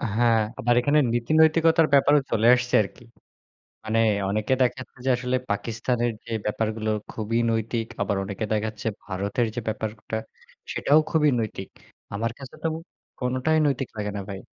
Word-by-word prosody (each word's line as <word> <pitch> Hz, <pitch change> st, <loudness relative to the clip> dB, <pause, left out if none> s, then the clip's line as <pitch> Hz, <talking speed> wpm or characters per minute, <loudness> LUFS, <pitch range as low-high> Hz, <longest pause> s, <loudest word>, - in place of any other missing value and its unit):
হ্যাঁ, 115 Hz, -1 st, +4 dB, 0.2 s
আবার 120 Hz, +1 st, +2 dB
এখানে 145 Hz, +3 st, +3 dB
নীতি 120 Hz, +5 st, -1 dB
নৈতিকতার 160 Hz, 0 st, +4 dB
ব্যাপারও 145 Hz, +1 st, +5 dB
চলে 115 Hz, +1 st, +3 dB
আসছে 125 Hz, 0 st, -1 dB
আরকি। 100 Hz, +4 st, -11 dB, 0.8 s
মানে 110 Hz, +1 st, 0 dB, 0.3 s
অনেকে 110 Hz, +5 st, 0 dB
দেখাচ্ছে 130 Hz, +1 st, -1 dB
যে, 135 Hz, -, +2 dB
আসলে 125 Hz, +1 st, 0 dB
পাকিস্তানের 120 Hz, +3 st, -1 dB
যে -, -, -9 dB
ব্যাপারগুলো 110 Hz, +1 st, -1 dB, 0.2 s
খুবই 115 Hz, +1 st, -2 dB
নৈতিক, 115 Hz, +1 st, -1 dB
আবার 100 Hz, 0 st, 0 dB
অনেকে 100 Hz, +2 st, -4 dB
দেখাচ্ছে 110 Hz, 0 st, -2 dB, 0.2 s
ভারতের 100 Hz, +5 st, -1 dB
যে 120 Hz, -, -1 dB
ব্যাপারটা 110 Hz, 0 st, -4 dB, 0.6 s
সেটাও 150 Hz, +2 st, +4 dB
খুবই 150 Hz, -3 st, +4 dB
নৈতিক। 105 Hz, -3 st, -4 dB, 0.4 s
আমার 115 Hz, +3 st, -1 dB
কাছে 135 Hz, -1 st, -10 dB
তো 165 Hz, -, +2 dB, 0.5 s
কোনটাই 130 Hz, +5 st, +1 dB
নৈতিক 135 Hz, -2 st, -1 dB
লাগে 105 Hz, -1 st, -2 dB
না -, -, -3 dB
ভাই। 95 Hz, -, -5 dB
115 Hz, 150 wpm, -25 LUFS, 110-130 Hz, 0.8 s, ব্যাপারও